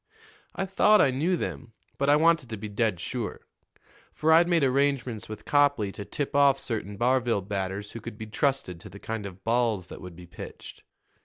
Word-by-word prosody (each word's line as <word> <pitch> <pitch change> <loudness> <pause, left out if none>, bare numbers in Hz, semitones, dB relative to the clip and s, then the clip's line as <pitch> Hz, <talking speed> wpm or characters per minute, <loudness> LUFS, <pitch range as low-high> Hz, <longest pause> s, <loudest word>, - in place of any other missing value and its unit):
"I 195 - -1
thought 210 +2 +4
I 135 - +5
knew 165 +8 +1
them, 120 -6 -5 0.3
but 140 +1 +2
I 145 - +7
wanted 160 -4 +3
to 110 - -4
be 105 +1 -6
dead 105 -3 0
sure; 115 +4 -4 0.7
for 160 +1 +1
I'd 170 +2 +6
made 170 -4 +3
arrangements 130 -4 0
with 110 - -8
Copley 145 -8 +3
to 100 - -7
tip 140 +8 -4
off 140 -1 +5
certain 105 -3 -4
Barville 120 -2 +2
batters 100 +1 -4
who 115 - -8
could 115 -1 -8
be 110 - -6
trusted 110 - -1
to 105 +4 -11
the 95 - -11
kind 110 0 -5
of 95 -1 -12
balls 115 -5 +1
that - - -9
would 90 -2 -9
be 90 +1 -11
pitched. 85 +2 -10
115 Hz, 200 wpm, -27 LUFS, 100-140 Hz, 0.7 s, I